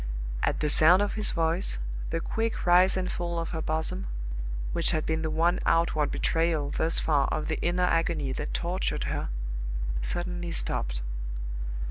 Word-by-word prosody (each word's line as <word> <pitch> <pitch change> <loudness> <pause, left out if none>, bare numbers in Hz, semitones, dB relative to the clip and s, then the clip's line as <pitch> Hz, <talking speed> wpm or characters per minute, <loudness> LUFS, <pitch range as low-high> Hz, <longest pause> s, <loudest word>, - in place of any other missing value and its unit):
At - - 0
the 150 - +1
sound 175 +7 +6
of 205 - -1
his 215 -1 +2
voice, 165 - +1 0.3
the 165 - -1
quick 225 +6 -2
rise 180 +2 +5
and 185 -1 -1
fall 170 -1 -3
of 165 0 -2
her 160 -2 -3
bosom 155 - -2 0.7
which - - +3
had 155 - +1
been 160 0 0
the 160 - -1
one 170 +3 +2
outward 165 -3 +2
betrayal 165 -3 0
thus 160 +1 +2
far 145 -3 +2
of 155 - -2
the - - -1
inner 175 +1 +1
agony 165 -5 +1
that - - -3
tortured 175 +2 -1
her - - -2 0.7
suddenly 175 - -1
stopped. - - -2
165 Hz, 160 wpm, -28 LUFS, 155-175 Hz, 0.7 s, sound